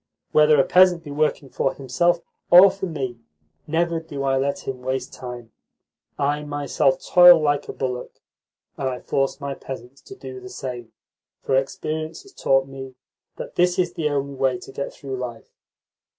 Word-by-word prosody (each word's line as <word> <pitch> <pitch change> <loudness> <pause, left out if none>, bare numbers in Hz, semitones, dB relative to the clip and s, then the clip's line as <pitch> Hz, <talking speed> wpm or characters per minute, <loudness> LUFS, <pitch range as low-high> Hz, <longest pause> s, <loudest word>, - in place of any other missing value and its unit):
Whether 150 -1 +5
a - - +6
peasant 180 0 +4
be 145 - -8
working 150 -1 0
for 135 - -1
himself 170 +7 +1 0.3
or 185 +2 +9
for 195 -1 -5
me, 130 -7 -4 0.5
never 165 +1 0
do 150 -4 -6
I 135 -1 +1
let 140 +1 -1
him 130 -1 -4
waste 130 +1 -3
time. 120 -2 -8 0.7
I 145 +1 0
myself 145 -2 0
toil 175 -1 +8
like 145 -2 0
a - - -1
bullock, 125 -2 -5 0.6
and 135 - 0
I 125 -1 -5
force 135 0 -1
my 140 -1 -4
peasants 135 0 -9
to 395 - -12
do 390 0 -9
the 380 0 -10
same, 125 - -7 0.5
for 135 - +1
experience 155 - -3
has 395 -1 -18
taught 135 - +2
me 135 -1 -9 0.4
that - - -8
that 180 0 +3
is 175 -1 0
the 155 -2 -1
only 140 -1 -2
way 130 -2 0
to - - -11
get 140 - -4
through 135 -2 -7
life. 120 -3 -7
140 Hz, 175 wpm, -23 LUFS, 130-165 Hz, 0.7 s, or